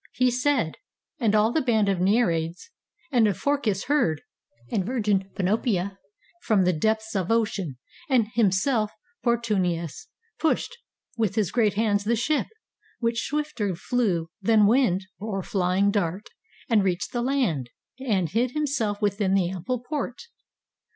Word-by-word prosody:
He 255 0 +2
said; 250 - +1 0.4
and 220 -4 +2
all 215 +2 +4
The 315 - +1
band 220 -6 +2
of 195 -2 +1
Nereids 180 - +1 0.4
and 235 -5 +4
of 200 - 0
Phorcus 275 -9 0
heard, 245 - +1 0.5
And 195 - +1
virgin 205 -4 0
Panopea, 195 -1 0 0.4
from 205 -4 +3
the 180 0 +3
depths 220 +6 0
Of 190 -2 -1
ocean; 205 - 0 0.3
and 250 -5 +4
himself 215 +1 +2 0.3
Portunus 200 - 0 0.3
pushed 320 +9 0 0.4
With 220 -5 0
his 210 -6 +1
great 215 -5 +2
hands 205 -2 +1
the 235 +2 +2
ship, 275 +6 0 0.5
which 230 -1 0
swifter 270 - -2
flew 180 -5 -1
Than 215 +1 +4
wind, 200 -5 +3
or 195 -2 -3
flying 190 +2 +1
dart, 200 0 -2 0.4
and 220 -4 +3
reached 180 -1 -1
the 240 - 0
land, 235 - 0 0.3
And 205 -10 0
hid 240 - 0
itself 230 -9 -1
within 200 -1 +1
the 185 -2 +1
ample 230 +7 -3
port. 280 -5 -3
210 Hz, 140 wpm, -25 LUFS, 190-240 Hz, 0.5 s, all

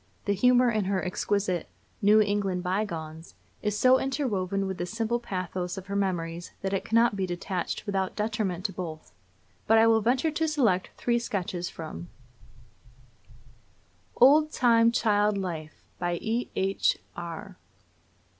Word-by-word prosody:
The 200 - +2
humor 250 +4 +4
in 215 -3 0
her 190 -1 -1
exquisite 185 -1 -1 0.3
"New 210 +2 +6
England 200 -3 0
Bygones" 170 -4 -4 0.3
is 210 -1 -1
so 255 +3 +5
interwoven 200 -9 -1
with 190 -1 -4
the 175 - -2
simple 225 +3 -1
pathos 185 -4 -4
of 190 - -7
her 200 0 -5
memories 175 -3 -2
that 195 0 -1
it 195 - 0
cannot 230 -1 +3
be 190 -1 -1
detached 180 +2 -3
without 195 -3 -1
detriment 210 -4 -2
to 195 - -1
both. 160 - -7 0.5
But 225 - +5
I 225 - +6
will 225 -1 +4
venture 255 +8 +1
to 320 +1 0
select 235 -12 +1
three 240 -1 +1
sketches 180 -6 -3
from 165 +1 -8 2.1
OLD 300 +4 +6
TIME 230 -3 +4
CHILD 210 -3 +2
LIFE. 165 -5 -5 0.2
BY 175 -1 -1
E.H. 220 -4 0 0.2
ARR. 175 +3 -7
200 Hz, 140 wpm, -27 LUFS, 180-225 Hz, 2.1 s, New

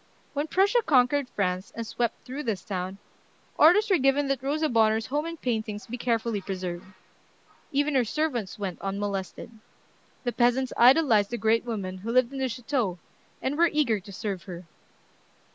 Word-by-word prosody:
When 290 +2 -2
Prussia 400 +8 +3
conquered 270 -3 +3
France, 185 -3 -2
and 230 - -4
swept 235 +1 -3
through 265 +4 -5
this 215 - -3
town, 185 -1 -4 0.6
orders 390 +8 +6
were 380 -5 +3
given 275 +1 +2
that 270 -2 0
Rosa 300 +4 0
Bonheur's 220 -3 +2
home 295 +4 -2
and 335 -1 -7
paintings 220 -4 -3
be 245 - -6
carefully 230 -3 -1
preserved. 185 -3 -5 0.8
Even 285 +1 +1
her 260 -2 +3
servants 240 - -2
went 195 -4 -5
unmolested. 195 +1 -4 0.7
The 245 - -1
peasants 245 +2 +1
idolized 240 -5 +5
the 240 - -3
great 225 +2 +2
woman 195 -5 -4
who 215 +5 -6
lived 255 +1 +3
in 270 - -5
the 260 -1 0
chateau, 235 -5 -2 0.5
and 265 +2 0
were 340 0 +5
eager 270 -9 +1
to 200 +2 -12
serve 195 -2 -5
her. 180 -2 -8
235 Hz, 165 wpm, -27 LUFS, 205-275 Hz, 0.8 s, orders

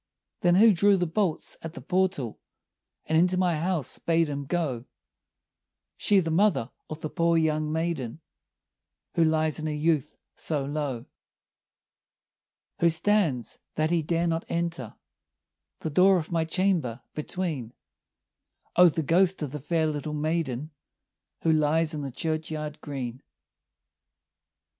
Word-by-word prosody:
"Then 175 0 +4
who 215 +3 +7
drew 200 +2 +4
the 180 - +1
bolts 175 0 -1
at 165 0 -7
the - - -6
portal, 180 - -1 0.7
And 160 - 0
into 180 +2 +3
my 180 -3 +2
house 170 -5 -1
bade 165 -1 +2
him 140 -1 -4
go?" 140 -8 -1 1.1
"She, 200 - +3
the 165 -3 -1
mother 170 - +2 0.2
of 155 0 -7
the 155 - -3
poor 170 0 +2
young 155 -1 +1
maiden, 160 -6 -2 0.9
Who 165 - +3
lies 155 -1 +2
in 155 - -3
her - - -1
youth 150 -2 0 0.2
so 145 -4 -2
low." 140 -5 -3 1.7
"Who 170 - +5
stands, 165 - +1 0.2
that 155 +1 +1
he 170 -1 +2
dare 165 +2 0
not 165 0 0
enter, 170 -9 -3 0.9
The 160 - -3
door 185 +5 +5
of 165 -1 -4
my 165 -1 +1
chamber, 165 -9 0
between?" 150 -7 -4 1.0
"O, 180 0 +8
the 160 0 -2
ghost 180 +3 +2
of 145 - -4
the 150 - -5
fair 160 +3 0
little 150 0 -3
maiden, 155 -2 -2 0.7
Who 165 - +4
lies 155 +1 +2
in 150 - -3
the 140 - -4
churchyard 155 +1 -3
green." 130 -4 -5
160 Hz, 140 wpm, -27 LUFS, 150-170 Hz, 1.7 s, O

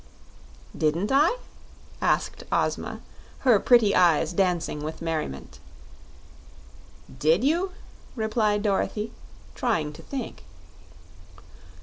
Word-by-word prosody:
"Didn't 165 - 0
I?" 300 - +4 0.6
asked - - 0
Ozma, - - -1 0.4
her 245 -6 +5
pretty 230 -4 +5
eyes 170 -2 +3
dancing 175 -5 0
with 155 +1 -5
merriment. 155 - -4 1.6
"Did 160 - +3
you?" 345 +7 +1 0.4
replied 215 -2 0
Dorothy, 210 +1 -1 0.4
trying 170 - -1
to - - -12
think. 260 - -6
205 Hz, 85 wpm, -26 LUFS, 160-240 Hz, 1.6 s, her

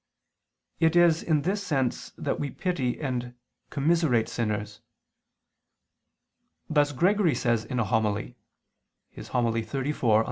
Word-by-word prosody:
It 165 0 +3
is 175 -2 +5
in 155 -3 +1
this 200 +3 0
sense 135 -9 -1
that - - -2
we 145 - -2
pity 140 -10 -2
and 125 -4 -3 0.3
commiserate 145 -6 +2
sinners. 105 -1 -3 1.9
Thus 145 -2 +2
Gregory 180 +3 +2
says 115 -3 0
in 130 - -4
a - - +3
homily 110 +2 -1 0.9
(Hom. 125 -2 +1
in 115 - +1
Evang. 120 -1 +1
135 Hz, 115 wpm, -27 LUFS, 115-160 Hz, 1.9 s, is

